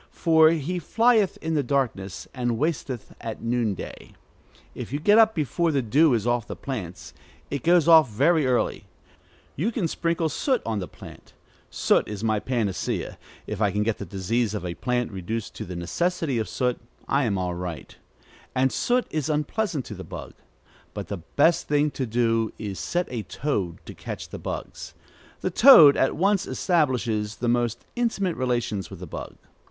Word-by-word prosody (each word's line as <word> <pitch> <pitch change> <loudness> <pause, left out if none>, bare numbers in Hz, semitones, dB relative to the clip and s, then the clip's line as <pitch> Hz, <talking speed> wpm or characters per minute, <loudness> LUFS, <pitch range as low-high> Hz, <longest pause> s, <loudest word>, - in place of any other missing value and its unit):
For 160 -1 +4
he 165 +2 -1
flieth 225 +3 +2
in 160 0 -1
the 150 - +2
darkness, 120 -8 -2
and 120 -3 -1
wasteth 140 -5 -3
at 115 -1 -6
noonday. 115 -4 -3 0.6
If - - -7
you 145 - -2
get 205 +8 +5
up 220 -1 +5
before 165 +2 0
the 140 -3 0
dew 140 +5 +4
is 110 -2 -2
off 120 -2 0
the - - -6
plants, 95 -10 -6 0.4
it 140 - -2
goes 170 0 +4
off 160 -5 +7
very 150 +7 +2
early, 125 -1 0 0.7
you 190 - 0
can 210 -7 -1
sprinkle 165 0 -1
soot 255 - 0
on 110 -2 -1
the 90 - -5
plant - - -14 0.4
(soot - - +2
is 105 0 -6
my 110 -1 +1
panacea: 110 -6 -2 0.3
if 105 0 -5
I 105 - +4
can 105 +2 0
get 110 0 -1
the - - -4
disease 105 +4 -1
of 100 - -4
a 85 - -3
plant 125 +4 -1
reduced 100 +3 -4
to - - -5
the 90 - -7
necessity 145 - -1
of 110 - -3
soot, 125 -2 -1 0.3
I 140 -1 +2
am 100 -4 0
all 90 -1 -2
right); 85 -2 -6 0.6
and 130 0 +2
soot 245 +1 +1
is 155 -3 -2
unpleasant 150 - -1
to - - -7
the 95 -2 -8
bug. 80 - -8 0.6
But - - -6
the 100 - -3
best 145 - +1
thing 150 0 +2
to 130 -1 -3
do 115 -1 +1
is 100 -3 -5
set 175 0 -1
a 120 -3 -3
toad 95 - -3
to - - -8
catch - - -7
the - - -7
bugs. - - -6 0.5
The 185 - -1
toad 170 - +9
at 135 - +1
once 195 +3 +1
establishes 125 - 0
the 120 +3 -3
most 120 -1 0
intimate 210 -7 0
relations 120 -6 -1
with 95 - -10
the 90 - -7
bug. 80 - -8
125 Hz, 180 wpm, -25 LUFS, 105-160 Hz, 0.7 s, toad